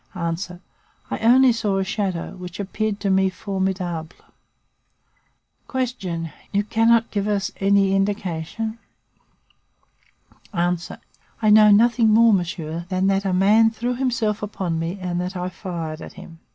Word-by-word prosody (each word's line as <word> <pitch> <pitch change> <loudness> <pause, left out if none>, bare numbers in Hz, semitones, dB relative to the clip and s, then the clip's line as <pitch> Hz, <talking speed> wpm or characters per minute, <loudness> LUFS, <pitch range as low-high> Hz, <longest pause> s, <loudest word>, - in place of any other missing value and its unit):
I 175 +1 -6
only 250 +3 +6
saw 210 -4 -1
a 195 - +1
shadow 190 -2 -3
which 180 0 -9
appeared 205 +1 -2
to 200 -2 0
me 190 0 +3
formidable. 185 -4 -3 1.6
"Q. 215 -11 -3 0.2
You 200 0 +1
cannot 225 +2 +2
give 205 -1 -1
us 205 0 -1
any 195 0 +3
indication? 200 +2 -2 1.8
"A. 175 +1 +2 0.7
I 215 - +4
know 215 0 +7
nothing 230 +2 +4
more, 225 +1 +6
monsieur, 170 -2 -3
than 185 0 0
that 195 +1 -1
a 190 - +1
man 210 +5 +5
threw 235 +2 -3
himself 235 -4 -1
upon 185 -5 -3
me 165 +4 -3
and 180 -1 -2
that 180 +2 -4
I 180 +1 -3
fired 170 -4 -6
at - - -9
him. 185 -4 -13
195 Hz, 135 wpm, -22 LUFS, 180-215 Hz, 1.8 s, know